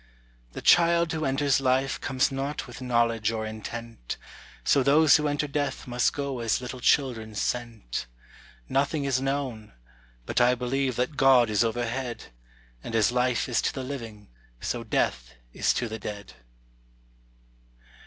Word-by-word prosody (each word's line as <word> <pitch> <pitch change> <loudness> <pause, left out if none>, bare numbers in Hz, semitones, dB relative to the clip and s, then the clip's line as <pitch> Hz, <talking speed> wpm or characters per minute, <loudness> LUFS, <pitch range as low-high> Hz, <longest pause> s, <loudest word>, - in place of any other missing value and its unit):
The - - -7
child 170 -1 +5
who 155 -1 -2
enters 135 0 +2
life 130 +1 +1
comes 130 -1 +1
not 135 +2 -3
with 120 -1 -11
knowledge 120 -3 +1
or 110 -1 -2
intent, 110 - -6 0.5
So 140 - +4
those 145 +4 +6
who 150 -1 -1
enter 145 +1 -1
death 145 -1 -2
must 120 -1 +1
go 140 -3 -3
as 115 -2 +1
little 125 0 -7
children 115 -5 +1
sent. 115 - -3 0.6
Nothing 140 +2 0
is 130 -2 +1
known. 135 - -3 0.5
But - - 0
I 125 +1 +5
believe 130 +1 -1
that 125 +5 -2
God 130 -4 +5
is 105 +1 +3
overhead; 120 - -3 0.5
And 115 - -5
as 110 -1 +3
life 125 -1 +1
is 120 - +1
to - - 0
the 135 - -5
living, 115 - -7 0.3
so - - -3
death - - -1 0.2
is - - +2
to 125 - -1
the 110 0 -6
dead. 100 -1 -7
125 Hz, 150 wpm, -27 LUFS, 115-135 Hz, 0.6 s, those